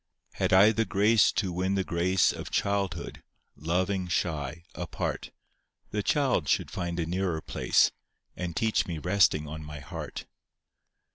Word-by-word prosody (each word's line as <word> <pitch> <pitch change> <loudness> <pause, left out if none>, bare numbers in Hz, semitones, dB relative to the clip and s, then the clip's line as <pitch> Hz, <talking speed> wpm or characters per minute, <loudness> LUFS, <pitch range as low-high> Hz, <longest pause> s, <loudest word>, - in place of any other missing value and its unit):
Had - - -1
I 95 +3 +7
the 115 +1 +1
grace 105 +1 +4
to 95 -5 -1
win 95 +2 0
the 95 - +1
grace 90 +2 +2
Of - - -7
childhood, 100 -4 -2 0.3
loving 90 +4 -1
shy, 80 -2 -2
apart, 85 -2 -4 0.6
The 105 - -1
child 125 - +1
should - - +1
find 85 -1 -3
a 85 - 0
nearer 90 -1 -1
place, - - +2 0.4
And 85 -2 -4
teach 110 -1 +1
me 85 -3 -3
resting 90 -3 +2
on 80 +1 -7
my 75 -1 -8
heart. 70 - -7
90 Hz, 145 wpm, -28 LUFS, 85-100 Hz, 0.6 s, I